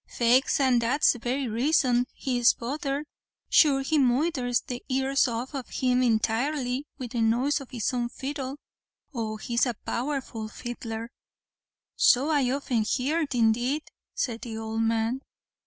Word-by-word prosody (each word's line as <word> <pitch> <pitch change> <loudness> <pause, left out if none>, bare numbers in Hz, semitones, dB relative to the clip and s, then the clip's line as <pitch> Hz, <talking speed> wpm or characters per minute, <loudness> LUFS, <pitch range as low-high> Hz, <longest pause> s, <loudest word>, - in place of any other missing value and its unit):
"Faix 245 +4 +2
an' 260 -3 +4
that's 250 +6 +3
the 245 - -9
very 255 +3 -2
raison 250 +1 +2
he 255 -2 -2
is 240 - +5
bothered; 275 +3 -3 0.5
sure 280 -4 +5
he 300 +3 +1
moidhers 255 -1 +1
the 245 -1 -6
ears 270 +1 +2
off 240 +4 -4
of 270 -3 -5
him 250 -1 +1
intirely 250 +4 0
with 250 -4 -6
the 240 -2 -1
noise 250 +7 +2
of 270 - -11
his 240 -1 -2
own 240 -1 -1
fiddle. 270 +1 -5 0.6
Oh 220 -3 -3
he's 235 +3 0
a 240 - -2
powerful 245 -4 -3
fiddler." 230 0 -6 0.8
"So 270 +5 +4
I 280 -5 +2
often 260 -3 0
heerd, 280 +5 -1
indeed," 240 +6 +2 0.3
said 235 -3 -2
the 225 -2 -6
old 225 0 -3
man. 225 +3 0
250 Hz, 150 wpm, -27 LUFS, 235-275 Hz, 0.8 s, is